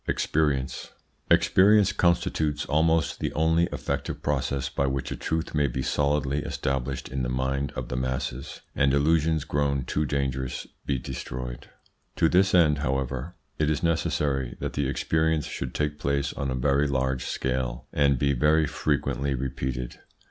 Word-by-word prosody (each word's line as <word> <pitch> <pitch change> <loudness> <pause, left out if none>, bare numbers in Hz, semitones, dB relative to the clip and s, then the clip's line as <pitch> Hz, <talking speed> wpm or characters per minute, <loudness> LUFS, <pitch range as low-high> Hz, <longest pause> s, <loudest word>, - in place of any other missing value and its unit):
EXPERIENCE 70 -4 0 0.4
Experience 105 +1 +5
constitutes 85 -4 +1
almost 80 +2 +2
the - - -1
only 80 +2 +3
effective - - -3
process 70 -1 0
by 70 0 -1
which 65 0 -2
a - - -2
truth 80 0 -2
may 75 -2 +2
be 65 +1 -3
solidly 70 -1 +1
established 65 -2 -2
in 65 +1 -3
the - - -1
mind 65 +2 -1
of - - -5
the - - -3
masses, 65 0 -3
and 70 0 +3
illusions 80 +1 +2
grown 70 -3 0
too 75 - 0
dangerous 65 -2 -2 0.2
be 70 - +1
destroyed. 60 0 -6 0.5
To 80 - +3
this 95 +3 +4
end, 75 -5 +4
however, 65 +2 -2 0.2
it 75 -1 +2
is 75 +1 -1
necessary 70 -6 0
that - - -3
the 70 -2 0
experience 80 +1 +1
should 65 - -5
take 75 0 -1
place 70 0 0
on 70 - -3
a 65 - -1
very 70 +3 +2
large 65 -2 -1
scale, 65 -1 -2
and 70 -2 +3
be 70 +2 +2
very 75 +4 +3
frequently 70 -1 -1
repeated. 65 -1 -4
70 Hz, 155 wpm, -26 LUFS, 65-75 Hz, 0.5 s, Experience